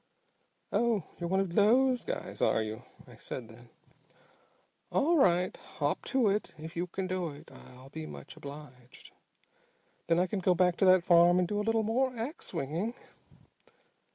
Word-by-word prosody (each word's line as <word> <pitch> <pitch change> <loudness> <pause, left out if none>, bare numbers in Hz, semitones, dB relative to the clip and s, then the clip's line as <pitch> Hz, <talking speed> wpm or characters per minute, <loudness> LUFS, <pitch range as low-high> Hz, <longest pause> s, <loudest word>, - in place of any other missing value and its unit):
'Oh, 230 -6 +1 0.2
you're 170 -1 -3
one 190 +1 +2
of 185 -3 -3
those 245 +6 +4
guys, - - -5
are 110 - +3
you?' 110 +2 -6 0.3
I 120 -3 -14
said 120 +1 -7
then. 120 +1 -15 1.2
'All 325 +5 +3
right, 180 -6 +3
hop 145 0 -3
to 260 -4 +2
it. 205 +2 -2
If 160 +1 -9
you 175 +2 -2
can 190 +2 -4
do 185 -2 -2
it 145 -1 -12
I'll 130 +1 -14
be 80 - -7
much 70 -2 -10
obliged. 140 -4 -11 1.0
Then 165 0 +3
I 180 - +3
can 195 +2 -3
go 180 -1 +2
back 180 +1 +2
on 190 - +5
that 185 -1 +5
farm 175 0 +6
and 180 -1 +2
do 205 +3 -2
a - - +1
little 225 +1 +1
more 250 +3 0
ax 245 +8 -5
swinging!'" 170 - -3
180 Hz, 170 wpm, -30 LUFS, 145-210 Hz, 1.2 s, farm